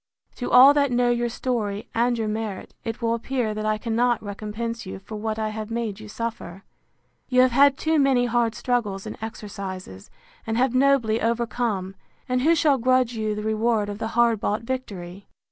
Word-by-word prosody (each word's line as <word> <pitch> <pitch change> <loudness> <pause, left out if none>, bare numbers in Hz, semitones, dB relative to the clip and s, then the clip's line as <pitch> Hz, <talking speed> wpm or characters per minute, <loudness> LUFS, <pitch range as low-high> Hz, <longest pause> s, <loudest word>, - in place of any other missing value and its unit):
To 245 - -3
all 265 +3 +8
that 285 -2 +2
know 245 0 +2
your 240 0 0
story, 220 -4 -3
and 240 +1 +1
your 220 -1 -1
merit, 215 -2 -4
it 225 +1 -5
will 230 0 +2
appear 235 -1 -2
that 215 0 -3
I 215 0 +1
cannot 235 +1 0
recompense 215 +3 -5
you 190 - -7
for 195 +3 -9
what 215 +1 -3
I 215 -1 -1
have 215 0 -6
made 225 -3 -3
you 215 - -10
suffer. 210 -4 -6 0.7
You 255 0 +5
have 255 0 +4
had 275 +2 +5
too 315 -1 +1
many 265 -3 +3
hard 235 -1 +1
struggles 215 -6 -1
and 215 - -6
exercises; 195 - -7 0.4
and 225 0 -1
have 255 0 +2
nobly 255 -4 +3
overcome: 230 -4 -1 0.3
and 255 0 0
who 325 +5 +4
shall 295 -4 +3
grudge 255 0 +2
you 215 -2 -2
the 210 - -4
reward 220 -1 +1
of 205 0 -6
the 225 - -2
hard 235 -2 +4
bought 210 +2 -1
victory? 200 -7 -6
230 Hz, 190 wpm, -24 LUFS, 215-245 Hz, 0.7 s, all